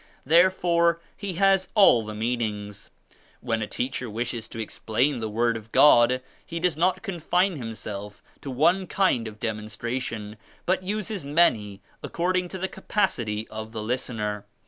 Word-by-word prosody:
Therefore 170 +1 +4 0.2
he 200 -3 -5
has 195 +1 +3
all 190 - +6
the 105 0 -7
meanings. 105 -3 -3 0.5
When 115 -2 -1
a 105 - -2
teacher 125 0 -3
wishes 115 +1 -4
to 115 - -10
explain 120 +5 -1
the 110 -1 -3
Word 115 +2 +1
of 110 0 -8
God 125 -3 +6 0.2
he 170 -1 -5
does 175 -2 +1
not 185 +4 +1
confine 180 -1 0
himself 105 -4 -7 0.2
to 140 - -7
one 170 +8 +2
kind 155 - +1
of 110 -1 -10
demonstration 110 0 -4 0.3
but 185 +1 +1
uses 205 0 -3
many 115 -10 +2 0.2
according 180 +1 -1
to 190 - -6
the 190 +1 -2
capacity 120 - -1
of 110 +1 -7
the 110 -2 -4
listener. 105 -4 -3
125 Hz, 145 wpm, -25 LUFS, 110-180 Hz, 0.5 s, all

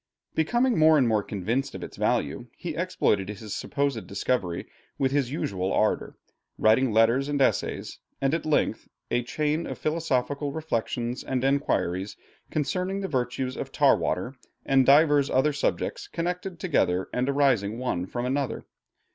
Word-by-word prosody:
Becoming 240 +7 +2
more 155 0 +6
and 130 -4 +4
more 110 -2 +2
convinced 115 +8 -2
of - - -6
its - - -8
value, - - -1
he - - -4
exploited 100 -2 0
his 105 0 -6
supposed 140 -5 -2
discovery 100 -3 -1 0.3
with 135 -1 +1
his 135 -3 0
usual 95 - -2
ardor, 110 - 0 0.4
writing 115 +3 +4
letters 115 +6 +3
and 145 -1 0
essays, 135 - 0 0.2
and 135 +1 +1
at 165 - 0
length 155 -1 0 0.2
'A 120 - +2
Chain 150 +4 -1
of - - -5
Philosophical 145 -3 -1
Reflections 120 -5 -2
and 130 -1 -2
Enquiries 105 -9 0 0.3
concerning 180 +7 -1
the 195 - -2
Virtues 130 -2 -2
of - - -5
Tar - - +5
water 95 +9 -2 0.3
and 135 -1 +3
divers 145 0 +5
other 140 +3 +2
subjects 145 - -2
connected 180 +1 -4
together 95 - +1
and 125 +2 0
arising 125 -7 +2
one 95 -8 -2
from 120 +3 -3
another.' 135 +1 -2
135 Hz, 150 wpm, -26 LUFS, 115-150 Hz, 0.4 s, more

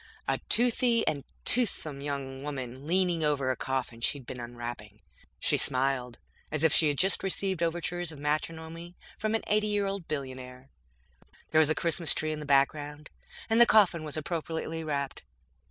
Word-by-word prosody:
A - - 0
toothy 240 0 +3
and 145 -2 0 0.2
toothsome 160 - +1
young 135 -2 -4
woman 135 -1 -6
leaned 175 -2 +2
over 140 -3 +1
a - - -1
coffin 125 -2 -3
she'd 135 +2 -1
been 125 - -7
unwrapping. 120 -3 -7 0.4
She - - +2
smiled 130 -2 +2 0.3
as 155 0 +1
if 160 -1 +4
she'd 150 -3 +3
just 190 +5 +3
received 190 -2 -1
overtures 175 0 -1
of 155 - -10
matrimony 160 +3 -4 0.2
from 215 +1 0
an 225 - -1
eighty 215 0 +2
year 205 -1 0
old 195 -3 -3
billionaire. 130 -2 -6 0.8
There 155 - +5
was 155 -1 +5
a 155 - +2
Christmas 170 -1 +3
tree 155 0 0
in 155 - -4
the 150 - -7
background, 145 +2 +1 0.4
and 225 +1 +4
the 235 - +8
coffin 185 -7 +4
was 155 0 -2
appropriately 160 0 -3
wrapped. 140 -3 -3
155 Hz, 165 wpm, -29 LUFS, 135-175 Hz, 0.8 s, the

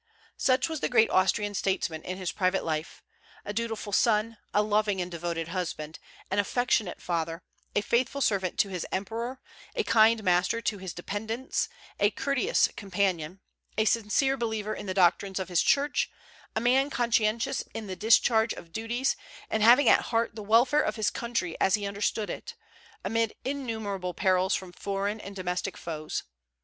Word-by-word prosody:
Such 260 +4 +3
was 320 -2 -4
the - - -1
great 225 -3 +4
Austrian 205 +2 +2
statesman 190 -5 -1
in 185 +3 -5
his 185 -2 -3
private 185 -1 0
life, 155 -1 -3 0.4
a 205 - -4
dutiful 225 -2 -3
son, 220 +1 +2
a 210 - +3
loving 210 -2 +1
and 180 0 -3
devoted 170 -1 -3
husband, 165 -3 -4 0.3
an 195 - +1
affectionate 220 -2 +1
father, 165 0 -2 0.3
a 205 - +3
faithful 250 +6 0
servant 195 -8 0
to 200 - -2
his 180 -3 -3
emperor, 230 +6 -3 0.4
a 455 - +1
kind 220 - +4
master 180 +4 +2
to 215 -3 -2
his 185 -2 -5
dependants, 220 - -3 0.3
a 205 - +5
courteous 280 - +1
companion, 190 -4 -1 0.4
a 215 - +3
sincere 230 +5 +2
believer 220 -3 -2
in - - -7
the 185 - -2
doctrines 190 +1 +3
of 190 -1 -3
his 175 -2 +3
church, 285 +1 +2 0.5
a - - +2
man 260 +4 +3
conscientious 235 +1 +1
in 225 - -4
the 190 -2 -5
discharge 220 +2 +4
of 165 -1 -12
duties, 235 +4 0 0.4
and 220 - +1
having 240 +6 +7
at - - +5
heart 230 -1 0
the 220 - -6
welfare 240 +8 +4
of 215 - -1
his 215 -2 +1
country 235 -8 -2
as 190 - +4
he 205 -1 -4
understood 205 +1 -1
it, 470 - -7 0.5
amid 225 -1 0
innumerable 220 -9 -3
perils 185 0 +2
from 185 -2 -5
foreign 200 +3 -3
and 200 0 -9
domestic 185 0 -3
foes. 155 -2 -4
210 Hz, 165 wpm, -28 LUFS, 185-230 Hz, 0.5 s, having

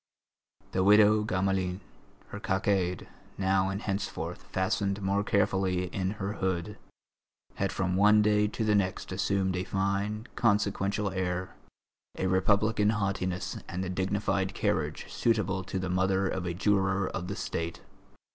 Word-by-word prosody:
The 95 - +1
widow 105 +1 +6
Gamelin, 95 -2 0 0.5
her - - -7
cockade 95 -2 0 0.3
now 95 0 +2
and 95 +1 -3
henceforth 100 -2 -3
fastened 100 +1 0
more 100 +1 0
carefully 95 -3 +1
in 95 0 -1
her 100 0 -3
hood, 95 0 -2 0.8
had - - 0
from 90 -1 -1
one 105 +2 +5
day 105 0 +3
to 110 +2 -3
the 105 -1 +2
next 95 -2 0
assumed 95 0 0
a 90 - -1
fine, 100 +3 -1
consequential 100 -2 +1
air, 90 -1 -2 0.6
a - - -1
Republican 105 +3 +2
haughtiness 95 -3 -1
and 90 +2 -3
the 90 - -3
dignified 95 0 -1
carriage - - -1
suitable 105 -5 0
to 95 - -4
the 95 0 -2
mother 95 +2 +1
of 95 -2 -3
a 85 - -2
juror 95 0 +2
of 90 - -4
the 100 - -4
State. 85 -5 -4
95 Hz, 140 wpm, -29 LUFS, 95-105 Hz, 0.8 s, widow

